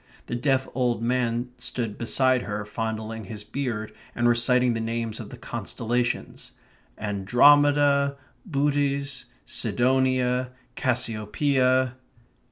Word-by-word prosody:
The - - -6
deaf 130 +1 +1
old 120 -2 0
man 120 0 0
stood 120 -4 -3
beside 130 +2 +2
her, 105 -2 -4
fondling 110 0 -4
his 105 +1 -7
beard, 110 -2 -4 0.2
and 120 0 +2
reciting 120 +1 +3
the 115 - -2
names 115 -1 -3
of - - -7
the - - -10
constellations: 120 +1 -3 0.4
"Andromeda, 140 +7 +4 0.3
Bootes, 140 -4 -1 0.2
Sidonia, 125 +1 +1 0.2
Cassiopeia...." 130 +2 +1
125 Hz, 100 wpm, -25 LUFS, 115-130 Hz, 0.4 s, Andromeda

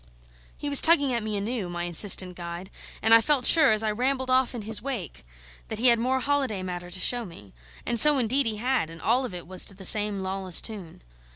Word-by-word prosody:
He 290 - -7
was 285 -1 +5
tugging 285 -6 +3
at 235 - -2
me 215 -1 -5
anew, 205 -2 -5
my 175 0 -6
insistent 180 +1 +1
guide; 175 +2 -9 0.3
and 225 +1 +3
I 230 - +6
felt 260 +1 0
sure, 315 -6 +6
as 215 0 0
I 215 - -1
rambled 260 +3 -2
off 255 -1 0
in 230 - -7
his 215 -1 -3
wake, 210 - -7 0.4
that 220 - -6
he 245 +3 +3
had 235 -1 +2
more 260 +3 -1
holiday 260 -8 -3
matter 175 -1 -7
to 180 +1 -7
show 245 +5 0
me. 165 - -14 0.3
And 235 - -2
so, 300 +2 +8
indeed, 255 +2 0
he 215 -1 -3
had; 250 -6 -2
and 165 0 -12
all 250 +8 0
of 195 - -8
it 175 - -9
was 185 +1 -2
to 195 - -6
the 190 0 -4
same 205 0 +3
lawless 190 -2 0
tune. 195 - -6
220 Hz, 230 wpm, -24 LUFS, 185-255 Hz, 0.4 s, so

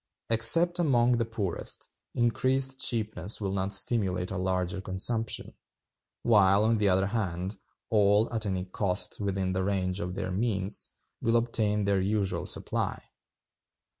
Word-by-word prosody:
Except 165 +11 +6
among 125 -6 +2
the 115 - 0
poorest, 105 -6 -2 0.3
increased 130 +3 +1
cheapness 105 -4 0
will 100 -3 -3
not 95 0 -2
stimulate 95 -3 +2
a - - -4
larger 95 0 -2
consumption; 110 +4 -2 0.7
while, 100 -3 +4
on 110 0 +1
the 105 -1 +2
other 95 +1 +2
hand, 95 -2 -3 0.3
all, 105 +1 +3
at 110 -2 -1
any 95 -1 -3
cost 95 0 0
within 95 -2 -2
the 95 0 -1
range 95 -1 -2
of 90 -2 -5
their 95 - -4
means, 100 -1 0 0.3
will 115 +1 +1
obtain 110 -3 0
their 100 -1 +1
usual 95 -3 -1
supply. - - -3
100 Hz, 135 wpm, -28 LUFS, 95-115 Hz, 0.7 s, Except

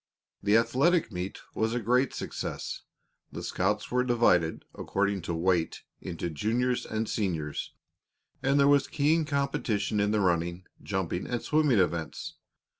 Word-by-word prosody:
The 105 +2 +4
athletic 130 +6 +2
meet 90 +1 -4 0.2
was 110 +2 0
a - - +1
great 125 +3 +2
success. - - -5 0.5
The - - -6
scouts - - -1
were 125 0 +2
divided, 115 -10 +2
according 100 -1 -1
to 85 - 0
weight, 85 0 0 0.2
into 85 -1 -4
juniors 120 - 0
and 110 0 -2
seniors, 80 -8 -2 0.7
and 140 +2 +2
there 140 - +5
was 140 -1 +4
keen 155 +2 +2
competition 115 -8 0
in 100 0 +2
the 105 0 +2
running, 85 -1 0 0.2
jumping, 95 -2 -2
and 120 - -1
swimming 150 -6 +3
events. 85 -4 -1
110 Hz, 140 wpm, -29 LUFS, 90-125 Hz, 0.7 s, there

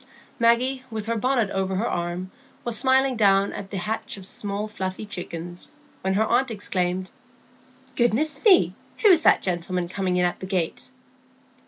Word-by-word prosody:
Maggie, 250 +3 +2
with 220 -2 -4
her 230 +1 -1
bonnet 240 -2 +1
over 190 0 -1
her 215 +5 0
arm, 175 +2 -3 0.3
was 240 -2 0
smiling 265 +2 +3
down 200 -2 +3
at 195 - -7
the 195 - -4
hatch 220 +3 -3
of 190 - -7
small 205 +2 -1
fluffy 190 -1 -4
chickens, 175 - -5 0.3
when 190 0 0
her 220 +2 +3
aunt 250 +3 +2
exclaimed,— 185 -3 -2 0.8
"Goodness 245 +6 +1
me! 395 -6 +6 0.3
who 425 - +8
is 345 -4 +6
that - - +4
gentleman 180 0 -1
coming 185 0 -1
in 180 - +3
at 175 - -1
the 185 - -6
gate?" 185 +3 -2
205 Hz, 165 wpm, -24 LUFS, 185-235 Hz, 0.8 s, who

